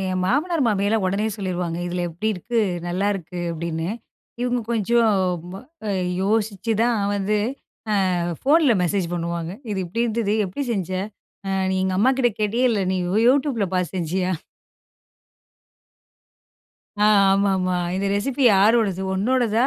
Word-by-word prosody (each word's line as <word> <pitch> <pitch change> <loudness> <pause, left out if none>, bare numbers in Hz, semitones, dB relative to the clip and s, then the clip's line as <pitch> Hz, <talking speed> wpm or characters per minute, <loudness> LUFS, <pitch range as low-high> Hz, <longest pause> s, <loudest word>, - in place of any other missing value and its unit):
என் 185 0 -1
மாமனார், 310 - +1
மாமியார்லாம் 205 0 +1
ஒடனே 200 +3 0
சொல்லிருவாங்க. 180 -3 -3
"இதில 175 0 -2
எப்டி 180 +7 -3
இருக்கு 230 +6 -3 0.3
நல்லாயிருக்கு." 180 -1 -2
அப்படின்னு. 165 0 -3 0.6
இவுங்க 245 -1 0
கொஞ்சம் 230 +1 +2 0.4
ம - - -8 0.3
அ - - 0 0.3
யோசிச்சுதான் 220 +2 +1 0.2
வந்து 205 +1 0 0.8
அ - - 0 0.2
ஃபோன்ல 290 -3 +4
மெசேஜ் 180 0 0
பண்ணுவாங்க. 170 -1 -3 0.2
"இது 195 - -2
இப்டி 210 +7 -2
இருந்தது. 220 -2 0
எப்டி 190 +10 -4
செஞ்ச? 190 -5 -2 0.6
அ - - -2 0.2
நீ - - 0
எங்க 190 0 0
அம்மாகிட்ட 255 0 +3
கேட்டியா? 230 +5 +1
இல்ல, 205 -3 0
நீ - - 0
யூ 180 - -1
YouTubeல 260 -6 +2
பாத்து 180 -1 -1
செஞ்சியா?" 180 +2 -1 2.7
ஆ. 210 - +5 0.3
ஆமாமா. 190 -2 +1 0.2
"இந்த 195 +1 -1
ரெசிபி 260 +7 -1
யாரோடது? 200 -2 +3
உன்னோடதா?" 235 +3 +2
200 Hz, 130 wpm, -22 LUFS, 185-230 Hz, 2.7 s, ஆ